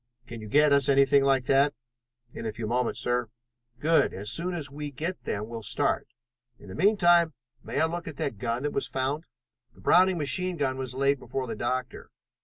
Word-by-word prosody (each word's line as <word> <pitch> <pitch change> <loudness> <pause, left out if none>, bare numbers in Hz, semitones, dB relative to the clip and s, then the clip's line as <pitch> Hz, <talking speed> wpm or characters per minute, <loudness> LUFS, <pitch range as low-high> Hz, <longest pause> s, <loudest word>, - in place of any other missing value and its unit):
Can 115 -1 -9
you 110 - -8
get 150 +5 +4
us 140 -1 +4
anything 140 0 +4
like 135 -2 +2
that?" 140 +1 +3 0.6
"In 115 - -6
a - - -2
few 110 +1 -6
moments, 120 +2 -1
sir." 120 -2 -1 0.5
"Good! 160 +2 +2
As 105 +3 -2
soon 175 +4 +1
as 145 -4 -4
we 150 +1 -6
can 140 - -20
get 170 +7 -5
them 105 +1 -3
we'll 115 0 -7
start. 105 - 0 0.5
In 100 - -15
the - - -8
meantime, 175 - +3 0.3
may - - -3
I 160 - +4
look 170 +1 -5
at 155 - -7
that 115 -8 -3
gun 120 +2 -2
that 145 - -2
was - - 0
found?" 135 +5 -2 0.5
The - - -18
Browning 185 0 +4
machine 180 +4 +1
gun 135 -3 -1
was 130 -1 -5
laid 140 +1 +1
before 135 0 -4
the 115 - -5
doctor. 125 +2 -4
140 Hz, 210 wpm, -27 LUFS, 125-160 Hz, 0.6 s, get